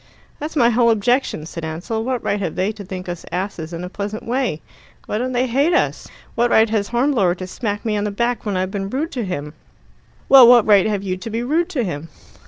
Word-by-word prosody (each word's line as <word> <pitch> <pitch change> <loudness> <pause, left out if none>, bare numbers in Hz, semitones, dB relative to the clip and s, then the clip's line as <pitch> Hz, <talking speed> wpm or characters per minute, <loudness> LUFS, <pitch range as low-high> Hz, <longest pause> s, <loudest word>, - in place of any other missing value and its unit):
"That's 305 +2 -5
my 240 -4 +4
whole 235 0 +3
objection," 230 - +1
said 165 0 -7
Ansell. 175 +8 -3
"What 255 0 -2
right 205 - 0
have 180 -5 -3
they 190 +3 0
to 215 -2 -9
think 185 -1 -7
us 175 -1 -5
asses 180 -2 -4
in 170 +1 -6
a - - -4
pleasant 205 +3 -5
way? 245 - -1 0.5
Why 210 - -2
don't 255 +2 -2
they 250 +1 +1
hate 275 +7 +2
us? - - 0 0.3
What 240 +1 +1
right 220 -1 +4
has 205 -2 0
Hornblower 235 -7 +1
to 185 - -6
smack 205 +2 -4
me 215 -2 0
on 205 0 -1
the - - 0
back 235 +3 -1
when 205 -3 -2
I've 185 +1 -1
been 195 -1 -3
rude 290 +8 -2
to 250 -4 -3
him?" 150 -6 -5 0.7
"Well, 265 -3 +9
what 240 -2 +7
right 205 -2 +5
have 205 -2 -1
you 185 -2 -2
to 225 +5 -7
be 225 +2 -2
rude 320 +7 0
to 260 -6 -1
him?" 165 -4 -5
215 Hz, 235 wpm, -20 LUFS, 185-245 Hz, 0.7 s, Well